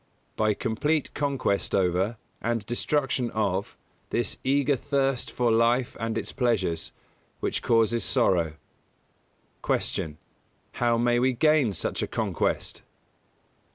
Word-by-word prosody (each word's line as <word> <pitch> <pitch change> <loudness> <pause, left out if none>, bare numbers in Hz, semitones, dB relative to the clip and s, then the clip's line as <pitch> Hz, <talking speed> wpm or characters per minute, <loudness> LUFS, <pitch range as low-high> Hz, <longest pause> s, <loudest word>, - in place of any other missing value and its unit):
By 110 -1 +2
complete 140 +6 -1
conquest 140 -8 0
over, 95 +4 +1 0.2
and 115 -2 -1
destruction 130 +1 0
of, 100 -3 -1 0.3
this 120 -3 -1
eager 140 +1 +2
thirst 135 -1 0
for 120 -2 +1
life 115 +2 +2
and 115 0 -2
its - - -4
pleasures, 110 -10 0 0.5
which - - -2
causes 115 0 +2
sorrow. 90 - +2 1.1
125. - - 0
Q. 75 -2 -4 0.6
_How 120 -1 +2
may 120 0 +3
we 130 +1 +2
gain 150 -2 +3
such - - -3
a - - -1
conquest? - - -1
120 Hz, 120 wpm, -26 LUFS, 110-130 Hz, 1.1 s, may